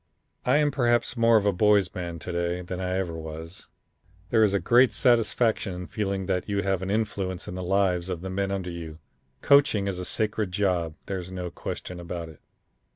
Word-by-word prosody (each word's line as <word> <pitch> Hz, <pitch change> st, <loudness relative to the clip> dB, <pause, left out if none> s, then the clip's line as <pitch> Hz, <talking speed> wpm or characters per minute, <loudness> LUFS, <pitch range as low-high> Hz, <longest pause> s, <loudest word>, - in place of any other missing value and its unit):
"I 130 Hz, +3 st, +5 dB
am 150 Hz, -1 st, +3 dB
perhaps 120 Hz, -2 st, +1 dB
more 115 Hz, -1 st, +5 dB
of 105 Hz, -, +1 dB
a 100 Hz, -, +4 dB
boy's 100 Hz, 0 st, +3 dB
man 85 Hz, -2 st, -5 dB
to 85 Hz, +3 st, -6 dB
day 85 Hz, +1 st, -1 dB
than 90 Hz, +1 st, -5 dB
I 90 Hz, 0 st, -1 dB
ever 90 Hz, -3 st, -2 dB
was. 80 Hz, +1 st, -8 dB, 0.6 s
There 110 Hz, -, +4 dB
is 100 Hz, -2 st, +3 dB
a -, -, +2 dB
great 120 Hz, +4 st, +5 dB
satisfaction 115 Hz, -5 st, +2 dB
in 90 Hz, 0 st, -6 dB
feeling 100 Hz, -1 st, -2 dB
that 95 Hz, +1 st, -2 dB
you 100 Hz, -1 st, 0 dB
have 95 Hz, -1 st, 0 dB
an 95 Hz, -, -3 dB
influence 100 Hz, -4 st, -2 dB
in -, -, -5 dB
the 90 Hz, -, -5 dB
lives 90 Hz, -1 st, +1 dB
of 90 Hz, -3 st, -3 dB
the 95 Hz, -, -5 dB
men 100 Hz, +1 st, -1 dB
under 95 Hz, -2 st, -3 dB
you. 80 Hz, -2 st, -7 dB, 0.5 s
Coaching 140 Hz, -8 st, +4 dB
is 95 Hz, -2 st, -2 dB
a -, -, -3 dB
sacred 105 Hz, -2 st, -1 dB
job. 90 Hz, -5 st, 0 dB
There's 95 Hz, -2 st, -5 dB
no 90 Hz, -2 st, -5 dB
question 90 Hz, +1 st, -6 dB
about 85 Hz, -1 st, -6 dB
it. 80 Hz, -, -14 dB
95 Hz, 205 wpm, -26 LUFS, 90-105 Hz, 0.6 s, I